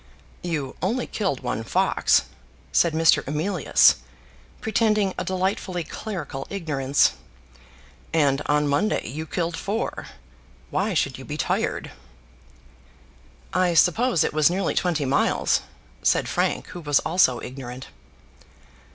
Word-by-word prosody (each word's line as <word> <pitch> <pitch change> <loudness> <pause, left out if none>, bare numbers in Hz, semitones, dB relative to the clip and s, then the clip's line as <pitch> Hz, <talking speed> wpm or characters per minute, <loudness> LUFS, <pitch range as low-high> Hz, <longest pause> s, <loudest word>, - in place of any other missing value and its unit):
"You 150 -7 -3
only 230 +8 0
killed 190 - -2
one 115 - -3
fox," - - +2 0.5
said 170 -2 +3
Mr. 160 -2 +4
Emilius, 155 +4 +3 0.6
pretending 215 -3 +1
a - - -3
delightfully 185 -1 -2
clerical 155 -6 -6
ignorance, 145 -8 +1 1.0
"and 145 -3 +2
on 150 0 +2
Monday 190 +10 0
you 155 +7 -5
killed 170 0 -2
four. 210 +6 -3 0.6
Why 195 +1 0
should 140 -4 0
you - - -8
be 150 - -5
tired?" - - -1 1.6
"I 180 -2 +2
suppose 180 - +4
it - - -1
was 155 0 +4
nearly 190 +2 -1
twenty 165 -5 0
miles," 135 +2 +2 0.4
said - - +2
Frank, - - -1
who 175 - -8
was 145 -3 +2
also 155 -5 +3
ignorant. 130 0 -8
165 Hz, 115 wpm, -24 LUFS, 145-190 Hz, 1.6 s, Mr